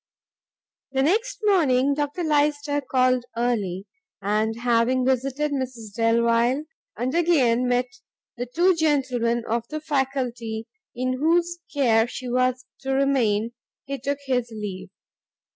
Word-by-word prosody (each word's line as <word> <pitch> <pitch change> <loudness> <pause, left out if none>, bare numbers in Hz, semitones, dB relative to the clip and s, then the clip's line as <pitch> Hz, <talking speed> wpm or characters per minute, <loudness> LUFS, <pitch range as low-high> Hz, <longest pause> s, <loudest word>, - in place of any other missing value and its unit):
The 265 0 +2
next 450 - 0
morning 285 -10 +3
Dr 295 +4 -2
Lyster 290 -1 +1
called 255 -2 +2
early, 205 -6 -1 0.3
and 215 +3 0
having 245 +1 +2
visited 270 +3 0
Mrs 250 -6 -4
Delvile, 235 +4 +2 0.3
and 250 +4 -1
again 265 -8 +3
met 245 0 +2 0.5
the 245 +1 -4
two 345 +9 +3
gentlemen 255 -7 +1
of 230 +1 -1
the 310 - -4
faculty 255 -6 -2 0.3
in 255 +1 -1
whose 345 +3 +2
care 235 -6 +3
she 250 +1 -7
was 255 +1 0
to 270 0 -2
remain, 240 -6 +2 0.3
he 275 0 -4
took 280 +3 -2
his 250 -3 0
leave. 195 -3 -6
255 Hz, 125 wpm, -24 LUFS, 235-285 Hz, 0.5 s, morning